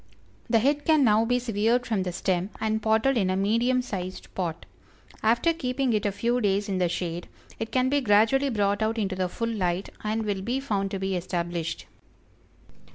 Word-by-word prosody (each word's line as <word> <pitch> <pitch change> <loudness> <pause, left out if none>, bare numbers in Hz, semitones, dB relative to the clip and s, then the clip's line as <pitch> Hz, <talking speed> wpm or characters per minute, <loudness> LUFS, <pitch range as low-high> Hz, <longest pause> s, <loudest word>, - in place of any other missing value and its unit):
The 230 - +4
head 285 +6 +2
can 310 -2 +4
now 220 -1 +4
be 245 +2 +2
severed 235 +1 +1
from 215 -4 0
the 185 -1 -2
stem 185 +1 -1
and 220 0 0
potted 220 +5 +2
in 190 -3 +1
a 185 - +1
medium 230 +6 +2
sized 185 -6 -6
pot. 170 -3 -3 0.6
After 235 +9 +3
keeping 260 -4 -1
it 210 0 +1
a - - 0
few 235 +5 0
days 200 -1 +1
in 190 -2 -1
the 180 -1 +2
shade, 175 0 -3 0.3
it 225 - -4
can 255 0 +2
be 285 +2 +2
gradually 225 +5 +3
brought 205 -3 0
out 220 +1 0
into 195 -4 -1
the 185 -1 -1
full 230 +4 -3
light, 185 -2 -1
and 215 +1 -1
will 200 -2 -1
be 245 +7 -1
found 200 -8 -1
to 195 - -3
be 190 0 -2
established. 175 -2 -3
215 Hz, 195 wpm, -26 LUFS, 190-245 Hz, 0.6 s, The